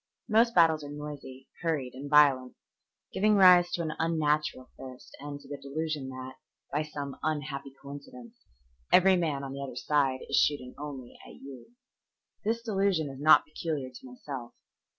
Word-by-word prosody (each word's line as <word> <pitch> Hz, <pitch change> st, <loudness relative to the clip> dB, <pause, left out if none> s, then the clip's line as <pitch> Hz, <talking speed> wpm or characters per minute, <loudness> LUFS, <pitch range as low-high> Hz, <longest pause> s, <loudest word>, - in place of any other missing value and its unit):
Most 230 Hz, +2 st, +3 dB
battles 160 Hz, -3 st, +4 dB
are 145 Hz, -, -7 dB
noisy, 145 Hz, -3 st, -8 dB
hurried, 155 Hz, -7 st, -1 dB
and 140 Hz, +3 st, -8 dB
violent, 140 Hz, -4 st, +4 dB, 0.6 s
giving 210 Hz, +1 st, +3 dB
rise 180 Hz, -2 st, +7 dB
to 170 Hz, -, -1 dB
an 155 Hz, -1 st, -3 dB
unnatural 150 Hz, -5 st, 0 dB
thirst 130 Hz, -1 st, -11 dB
and 145 Hz, 0 st, -7 dB
to -, -, -16 dB
the 140 Hz, -1 st, -7 dB
delusion 150 Hz, 0 st, -4 dB
that, 130 Hz, 0 st, -8 dB, 0.4 s
by 150 Hz, -, +1 dB
some 145 Hz, -2 st, -6 dB
unhappy 140 Hz, -3 st, -3 dB
coincidence, 235 Hz, -, -11 dB, 0.6 s
every 190 Hz, +1 st, +6 dB
man 155 Hz, -6 st, -1 dB
on 135 Hz, 0 st, -6 dB
the 140 Hz, -, -6 dB
other 135 Hz, -3 st, -6 dB
side 135 Hz, 0 st, 0 dB
is -, -, 0 dB
shooting 130 Hz, -4 st, +1 dB
only 140 Hz, -4 st, -8 dB
at -, -, -13 dB
you. 135 Hz, -, -12 dB, 0.7 s
This 230 Hz, +2 st, -1 dB
delusion 195 Hz, -9 st, 0 dB
is 135 Hz, -, -11 dB
not 155 Hz, +2 st, +6 dB
peculiar 150 Hz, -4 st, -4 dB
to 125 Hz, -, -12 dB
myself. 125 Hz, -1 st, -8 dB
145 Hz, 160 wpm, -29 LUFS, 135-165 Hz, 0.7 s, rise